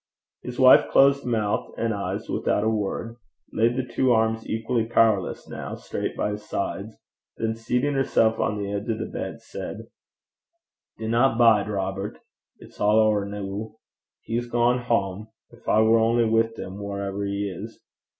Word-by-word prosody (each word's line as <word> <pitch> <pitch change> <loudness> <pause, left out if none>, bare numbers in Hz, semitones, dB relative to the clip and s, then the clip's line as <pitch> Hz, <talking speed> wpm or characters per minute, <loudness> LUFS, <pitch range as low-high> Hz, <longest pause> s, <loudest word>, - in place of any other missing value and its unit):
His 125 -1 -7
wife 130 0 +7
closed 140 0 +4
mouth 110 -3 -1
and 115 -1 0
eyes 100 -1 -4
without 105 - 0
a 110 - +2
word, 110 +2 -3 0.4
laid 115 +2 +2
the 130 -1 -1
two 130 +1 +1
arms, 110 0 0
equally 115 +1 0
powerless 110 -5 +2
now, - - -6
straight - - -5
by 105 - 0
his 105 0 -6
sides, 100 +2 -4 0.4
then 110 0 -1
seating 125 +5 -1
herself 115 -4 +2
on 105 - 0
the 100 -1 -3
edge 100 +3 -4
of 110 - 0
the - - -3
bed, - - -6
said, - - -7 1.2
'Dinna 115 +3 +2
bide, 110 -4 +5
Robert. 95 0 -3 0.4
It's - - -16
a' - - -1
ower 105 -1 +3
noo. 100 +1 -6 0.5
He's 120 +1 -2
gang 120 +1 +2
hame. 105 -4 -1 0.2
Gin 120 0 -18
I 110 - +4
war 115 +1 +5
only 115 +1 +3
wi' 115 0 +2
'im 95 +2 -7
wharever 100 0 -4
he 100 0 -2
is!' 90 -4 -8
110 Hz, 160 wpm, -25 LUFS, 100-115 Hz, 1.2 s, wife